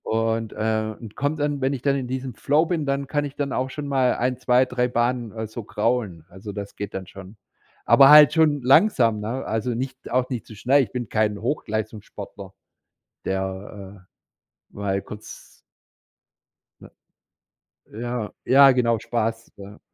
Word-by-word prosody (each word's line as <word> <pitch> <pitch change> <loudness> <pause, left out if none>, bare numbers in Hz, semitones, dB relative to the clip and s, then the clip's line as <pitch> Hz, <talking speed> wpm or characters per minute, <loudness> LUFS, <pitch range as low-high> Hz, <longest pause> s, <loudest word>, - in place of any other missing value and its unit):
Und, 115 0 -1
ähm 110 0 -1
und 110 -3 -11
kommt 145 +2 -2
dann 145 -1 -1
wenn 135 +1 +1
ich 130 - -5
dann 140 -1 +2
in 130 -2 -3
diesem 130 0 -4
Flow 145 +8 +2
bin, 165 -3 -2
dann 140 0 -2
kann 145 +1 -1
ich 140 -1 -8
dann 140 -2 -3
auch 130 +1 -1
schon 145 +1 -6
mal 130 -3 +2
1, 125 +1 -1
2, 125 0 +3
3 125 -1 -1
Bahnen, 120 -1 -1
äh, 110 0 -5
so 110 +2 -8
kraulen. 105 -6 -2
Also, 95 +3 -9
das 100 0 -7
geht 100 -1 -6
dann 95 -1 -6
schon. 95 +2 -12 0.5
Aber 135 -1 +7
halt 150 -2 +9
schon 155 -3 +3
langsam, 125 - +4
ne, 115 +6 -4
also, 110 +2 -2
nicht 130 +2 -5
auch 125 +1 +1
nicht 125 -5 -4
zu 110 - -11
schnell. 135 +6 +3
Ich 105 - -8
bin 120 -2 -4
kein 105 -2 0
Hochleistungssportler, 110 -5 -5 0.7
der, 95 0 -5 0.7
äh, - - -29
mal 100 -1 -2
kurz 105 0 -11 1.3
Ne - - -13 1.1
ja, 120 -3 -3 0.2
ja 135 +1 +7
genau, 120 -3 +1
Spaß 115 0 -3
ver 100 +1 -12
120 Hz, 170 wpm, -23 LUFS, 105-135 Hz, 1.3 s, halt